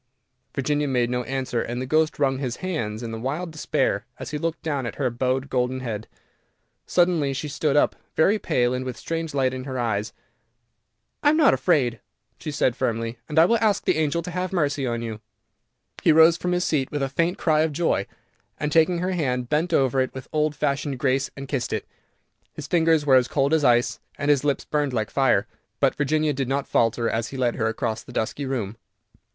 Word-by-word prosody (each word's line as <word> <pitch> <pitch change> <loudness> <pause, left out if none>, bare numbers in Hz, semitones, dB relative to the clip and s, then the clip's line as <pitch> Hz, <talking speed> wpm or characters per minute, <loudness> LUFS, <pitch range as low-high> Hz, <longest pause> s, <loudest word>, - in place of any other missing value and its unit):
Virginia 145 +2 0
made 125 -3 +1
no 125 0 0
answer, 130 -3 -2
and 120 +1 -4
the 130 - -3
ghost 155 +4 +1
wrung 135 -2 +1
his 125 -4 -2
hands 120 -12 -3
in 115 -1 -5
wild 155 +7 -3
despair 130 -9 0
as - - -7
he 150 - -3
looked 165 +1 -3
down 140 -6 -2
at - - -6
her 130 -4 0
bowed 130 +3 -1
golden 130 0 -1
head. 110 -3 -4 0.8
Suddenly 175 -6 +2
she 140 +3 -4
stood 150 0 0
up, - - +3 0.2
very 200 +7 +3
pale, 125 -9 +1
and 125 0 -2
with 130 -2 -5
a - - -18
strange 165 -2 -4
light 130 -2 +2
in 130 0 -5
her 130 -2 -4
eyes. 110 -3 -1 1.1
"I 290 - +5
am 310 - +3
not 310 -3 +6
afraid," 130 - +2 0.4
she - - -5
said 140 -4 +1
firmly, 115 -2 -2
"and 150 - -4
I 160 - +8
will 230 +5 +3
ask 215 -3 +2
the - - +2
angel 160 +2 0
to 180 - -6
have 180 +1 -2
mercy 145 -6 0
on 115 -1 -2
you." 110 -2 -5 0.8
He - - +5
rose 160 +1 +7
from 180 +1 -2
his 180 0 +1
seat 135 -4 0
with 145 -2 -2
a - - +1
faint 170 +6 0
cry 155 -2 +2
of 160 0 +1
joy, 145 -10 0 0.5
and 150 0 -1
taking 165 +3 +4
her 180 +2 -1
hand 125 -8 -1
bent 155 +4 +1
over 135 -4 +3
it 130 - -3
with 130 - -7
old 150 -1 +1
fashioned 140 -1 -1
grace 135 +1 +1
and 135 0 -6
kissed 130 -3 -2
it. - - -2 0.7
His - - -7
fingers 165 -3 +3
were 135 -2 +6
as 125 -1 +2
cold 140 +1 +1
as 160 -2 +3
ice, 120 -2 +3 0.2
and 145 +1 +2
his 145 -2 +2
lips 145 -1 0
burned 145 -3 -1
like 110 -3 -1
fire, 125 -7 +3 0.3
but 135 - +3
Virginia 150 +1 +1
did 135 -1 -2
not 135 +1 -1
falter, 115 0 +1
as 115 +1 -1
he 135 - -7
led 125 -2 +1
her 110 - +1
across 110 0 -2
the - - -13
dusky 125 +4 -2
room. 115 -5 -3
135 Hz, 215 wpm, -24 LUFS, 125-155 Hz, 1.1 s, I